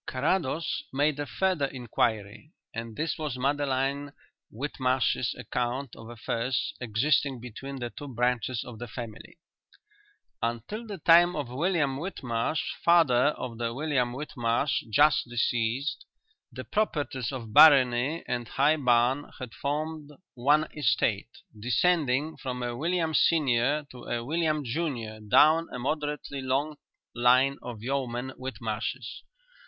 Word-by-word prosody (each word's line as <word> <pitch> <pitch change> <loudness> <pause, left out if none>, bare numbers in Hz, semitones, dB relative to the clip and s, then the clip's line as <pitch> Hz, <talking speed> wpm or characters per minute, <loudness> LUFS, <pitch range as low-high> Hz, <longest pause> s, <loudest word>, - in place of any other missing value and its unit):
Carrados 160 +3 0
made 145 +2 +1
a 145 - -3
further 185 -6 0
inquiry, 115 0 -2 0.2
and 115 -1 -6
this 160 0 -2
was 150 -5 -3
Madeline 140 +1 0 0.4
Whitmarsh's 130 -1 0
account 125 +1 -3
of 115 0 -11
affairs 120 +2 -2
existing 130 +3 +1
between 125 +4 -8
the 120 -2 -5
two 145 - -9
branches 125 -1 -1
of 115 -3 -10
the 120 - -6
family: 115 +3 -9 1.0
Until 120 - -3
the 205 -2 -6
time 175 +2 +5
of 145 -5 -3
William 145 0 0
Whitmarsh, 140 -4 -2 0.2
father 145 -7 +5
of 120 -2 -6
the 115 0 -2
William 135 -4 0
Whitmarsh 130 -1 -1
just 150 +2 +4
deceased, 120 +3 -1 0.5
the - - -7
properties 145 - -1
of 115 -5 -7
Barony 135 +1 +6
and 120 -1 -2
High 145 +6 +2
Barn 125 +1 +2
had 125 -3 -8
formed 150 +1 -3 0.2
one 145 +5 +3
estate, 115 -7 +1 0.3
descending 145 +4 +1
from 125 -2 -4
a 120 -1 -3
William 165 +3 0
senior 145 -2 +2
to 125 - -11
a 120 0 -3
William 155 0 0
junior 120 -6 -3
down 155 +10 +4
a - - -5
moderately 145 +1 -3
long 140 +4 -1 0.4
line 130 +3 +3
of 115 -3 -8
yeomen 130 -1 -2
Whitmarshes. 125 -1 -5
130 Hz, 125 wpm, -28 LUFS, 120-150 Hz, 1.0 s, Barony